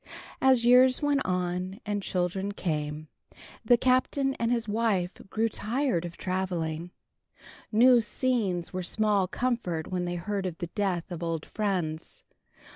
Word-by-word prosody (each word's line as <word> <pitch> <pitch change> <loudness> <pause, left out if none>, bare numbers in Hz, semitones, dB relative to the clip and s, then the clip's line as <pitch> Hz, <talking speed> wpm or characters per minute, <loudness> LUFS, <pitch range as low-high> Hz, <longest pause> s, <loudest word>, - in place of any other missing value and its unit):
As 260 -3 +4
years 255 +2 +6
went 290 -1 +2
and 180 +2 -2 0.2
children 190 +2 -2
came, 155 -4 -3 0.6
the 240 +2 +5
Captain 260 +2 +2
and 230 0 +1
his 235 -2 0
wife 205 -5 +1 0.2
grew 225 +3 +1
tired 225 - -1
of 170 0 -8
traveling. 175 -3 -2 0.8
New 240 +2 +6
scenes 210 -6 -1
were 185 - -2
small 205 0 +1
comfort 190 -9 -2
when 180 -1 -1
they 175 0 -3
heard 190 +2 -2
of 170 -2 -6
the 175 -2 -6
death 190 -4 -1
of 175 -1 -5
old 165 -2 -2
friends. 180 -7 -3
190 Hz, 135 wpm, -28 LUFS, 175-235 Hz, 0.8 s, years